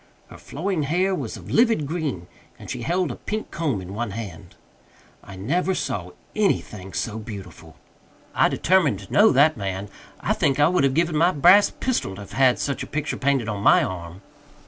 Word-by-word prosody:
Her - - -10
flowing 180 +3 -3
hair 180 +7 +1
was 185 - -4
of - - -10
livid 225 -10 +3
green, 145 - -3 0.3
and - - -9
she - - -5
held 175 -3 0
a - - -6
pink 215 +1 -5
comb 140 - -2
in 95 +1 -8
one 115 +1 -3
hand. 95 -5 -8 0.7
I 100 - -11
never 175 - -1
saw 90 - -4 0.2
anything 105 - -1
so 110 +5 -3
beautiful. 95 -7 -10 0.6
I - - +3
determined 170 - +2
to 95 - -11
know 215 +2 +6
that 145 +2 +4
man. 100 0 -4 0.3
I - - 0
think 135 0 +1
I 145 +2 +5
would 180 -6 +2
have 135 -1 +1
given 165 0 +1
my 165 +3 +4
brass 185 +5 +6
pistol 240 - -2
to 100 - -9
have 100 - -11
had 130 -2 +4
such 140 - -2
a - - -5
picture 150 +1 -3
painted 135 -4 0
on 105 -2 -3
my - - +5
arm. 90 0 -6
135 Hz, 190 wpm, -23 LUFS, -, 0.7 s, know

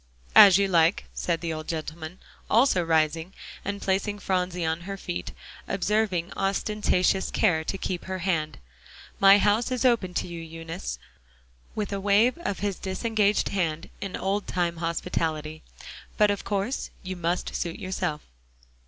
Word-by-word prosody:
"As 195 -2 +10
you 200 0 +2
like," 170 -1 +3
said 170 -2 -1
the 165 -2 -2
old 155 0 -6
gentleman, 160 +1 -5 0.3
also 230 -5 +4
rising, 160 +2 +1 0.3
and 200 0 -4
placing 200 +2 0
Phronsie 180 -3 -1
on 160 +1 -1
her 195 - -4
feet, 90 - -5 0.4
observing 195 -3 0
ostentatious 195 -1 +1
care 165 -7 +2
to 195 - -3
keep 185 -2 -4
her 190 0 -3
hand. 170 -4 -1 0.6
"My 195 +1 +8
house 210 +4 +2
is 255 0 -1
open 215 -8 +2
to - - -1
you, 170 -1 -7
Eunice," 165 +2 -6 0.8
with 210 -1 -3
a 200 - -2
wave 205 +5 +4
of 200 - -3
his 200 -2 -2
disengaged 210 +2 +1
hand 165 -5 -2
in 195 -2 -4
old 195 +2 -1
time 175 -2 -1
hospitality, 155 -2 -2 0.6
"but 210 -1 +5
of 200 - -3
course 205 +6 -2
you 185 0 -4
must 175 +1 -2
suit 170 -1 -3
yourself." 180 -5 -3
185 Hz, 150 wpm, -26 LUFS, 165-200 Hz, 0.8 s, As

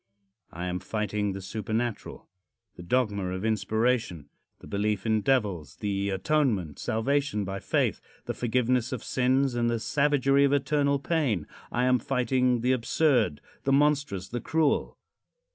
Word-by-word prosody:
I 90 +1 -5
am 90 0 -2
fighting 105 0 -2
the 95 0 -7
supernatural 110 +4 -4 0.5
the - - -10
dogma 105 0 0
of 95 +3 -3
inspiration 110 - 0 0.3
the - - -15
belief 105 -1 -1
in 110 -1 +2
devils 100 - 0
the 100 -1 -2
atonement, 100 - 0
salvation 120 -1 0
by 95 +1 -4
faith - - 0 0.2
the - - -3
forgiveness 125 0 0
of 130 -4 -4
sins 130 +1 +1
and 120 -1 +1
the 115 -1 0
savagery 140 +1 +2
of 140 0 +3
eternal 140 0 +2
pain. 135 - 0 0.3
I 125 +1 +1
am 125 0 +3
fighting 125 -1 +1
the 125 +2 +2
absurd, 125 - +2 0.2
the 135 - +2
monstrous, 140 -9 +1
the 120 0 -4
cruel. 160 -2 0
120 Hz, 145 wpm, -27 LUFS, 100-135 Hz, 0.5 s, of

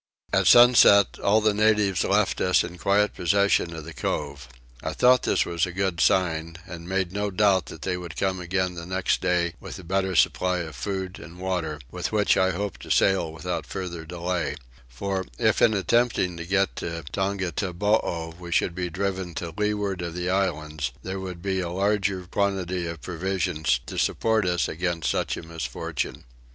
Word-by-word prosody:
At - - +3
sunset 120 -5 +7
all 105 +2 +3
the 105 -1 +3
natives 105 -3 +2
left 100 0 +1
us 90 -1 +3
in 90 0 -8
quiet 105 +3 +2
possession 100 -1 +2
of 80 -2 -8
the 85 - -8
cove. 70 -2 -3 0.3
I - - -3
thought 125 0 +5
this - - +1
a 85 +1 -1
good 95 -2 -1
sign, 85 -4 +1
and 85 0 -9
made 95 -2 0
no 105 +1 -1
doubt 95 -1 +2
that 75 - -9
they 90 -1 -1
would 85 -2 -8
come 95 -1 0
again 90 +1 -1
the 85 -1 -8
next 95 0 0
day 90 -2 +1
with - - -8
a 95 - -10
better 95 +1 -1
supply 90 +1 +2
of 80 -4 -7
food 95 +8 -4
and 85 +1 -11
water, 90 -5 -2
with - - -3
which 105 -2 +3
I 95 - +3
hoped 100 +2 -4
to - - -10
sail 95 -4 +3
without 80 +2 -4
farther 90 -4 -5
delay: 85 0 -3 0.3
for 95 +11 -3
if 110 -2 +2
in 110 - +5
attempting 105 -3 +1
to 85 0 -7
get 100 +1 +1
to 85 -1 -4
Tongataboo 95 -3 -1
we 85 -1 -8
should 85 - +1
be 90 0 -3
driven 95 -1 -3
to 85 -2 -5
leeward 105 -3 -1
of 85 -1 -5
the 90 +1 -1
islands 75 -7 -1
there 95 +1 -4
would 90 -2 -7
be 95 -1 0
a 90 -2 -2
larger 95 0 0
quantity 95 -2 -1
of 85 -2 -7
provisions 90 -6 -1
to - - -4
support 110 -4 +1
us 90 -5 +1
against 85 -1 -1
such - - -1
a - - -7
misfortune. 80 -6 -4
90 Hz, 180 wpm, -25 LUFS, 85-100 Hz, 0.3 s, sunset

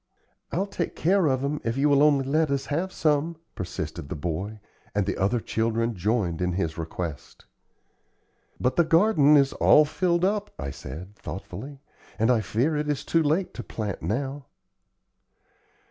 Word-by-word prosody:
"I'll 190 +4 0
take 185 -4 -4
care 185 +1 +3
of 130 -1 +1
'em 145 +1 -2
if 115 +2 -1
you 140 +2 +3
will 140 -1 +4
only 145 -3 +4
let 155 +3 +2
us 140 -1 -1
have 180 +5 -1
some," 155 +1 +1 0.2
persisted 85 -4 -5
the - - -3
boy; 90 +8 -4 0.4
and 100 -1 +2
the 100 - -1
other 100 +5 +1
children 115 +1 0
joined 95 -3 0
in 90 0 0
his 80 -3 -1
request. 80 -2 -6 1.1
"But 125 - 0
the 170 - +6
garden 160 -3 +5
is 140 -1 +3
all 150 - +6
filled 175 +3 +1
up," 205 +1 0
I 70 -1 -4
said, 85 +9 -9
thoughtfully; 105 - -8 0.4
"and 115 +3 +3
I 115 -3 +3
fear 120 - 0
it 150 0 -1
is 145 - -2
too 165 - +2
late 160 +5 0
to - - -6
plant 105 -4 -5
now." 135 +4 -3
135 Hz, 165 wpm, -26 LUFS, 100-150 Hz, 1.1 s, the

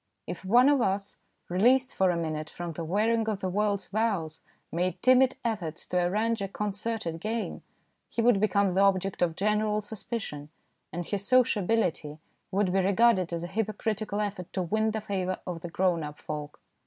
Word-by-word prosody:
If - - -6
one 240 +7 +5
of 285 -3 +4
us, 195 -1 -1 0.3
released 245 +8 +3
for 190 -1 +3
a 175 - +1
minute 155 -2 -3
from 175 -1 -6
the 165 - -5
wearing 220 +6 +1
of 210 -3 -2
the 185 - -1
world's 200 0 -1
woes, 195 -8 -1 0.3
made 180 +1 -1
timid 255 0 +5
efforts 175 -9 -2
to 180 - 0
arrange 215 +5 0
a 195 - -1
concerted 210 -3 -3
game, 220 +5 -3 0.5
he - - -6
would 230 -3 +4
become 200 -2 +2
the 190 - +3
object 195 -1 +2
of 170 -2 +2
general 210 +2 +1
sus 210 0 -7
picion, 150 -11 -5 0.4
and 175 0 -4
his 200 +2 -2
sociability 210 - +2 0.3
would 190 -1 +1
be 195 - +3
regarded 195 -2 +3
as 170 0 -2
a - - -3
hypocritical 215 0 -2
effort 200 -4 -4
to 185 - -1
win 215 +5 +1
the 220 0 -2
favour 190 -3 -2
of 175 -3 -5
the 175 - -6
grown 180 -1 +1
up 150 -1 -6
folk. 150 -1 -6
195 Hz, 180 wpm, -28 LUFS, 175-220 Hz, 0.5 s, one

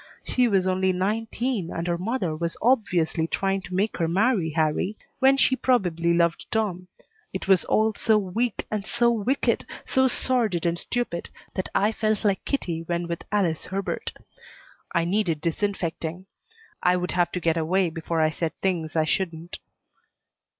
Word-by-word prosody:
She 250 -1 +2
was 195 -4 +2
only 190 0 +2
nineteen, 215 +2 -1
and 165 - -3
her 175 -1 +1
mother 190 -5 -1
was 170 +1 -3
obviously 180 -9 +2
trying 195 +2 0
to 180 0 -7
make 205 +4 0
her 165 - +1
marry 190 0 +2
Harrie 160 +6 0 0.2
when 270 +1 +5
she 265 - +4
probably 180 -11 +1
loved 170 0 +1
Tom. 190 -5 -1 0.5
It 190 - -4
was 190 -3 +4
all 220 0 +2
so 220 +1 +3
weak 210 +3 -1
and 210 -2 -1
so 235 +3 +2
wicked, 235 +4 +1 0.2
so 260 -1 +3
sordid 230 -9 +1
and 170 0 0
stupid, 240 -8 -3 0.2
that 185 - -3
I 210 +2 +3
felt 215 -1 -1
like 200 -2 +2
Kitty 170 - -1
when 170 +1 -2
with 170 -1 -4
Alice 185 -7 +1
Herbert. 195 +1 -3 0.8
I 170 -1 +1
needed 175 -4 +1
disinfecting. 170 0 -2 0.6
I 180 0 +3
would 180 0 -2
have 175 -1 +1
to 180 - -1
get 165 -1 +1
away 170 +2 +1
before 165 0 -2
I 155 0 +3
said 160 -1 -2
things 170 -5 -1
I 160 -1 +3
shouldn't. 170 0 -2
185 Hz, 165 wpm, -25 LUFS, 170-215 Hz, 0.8 s, when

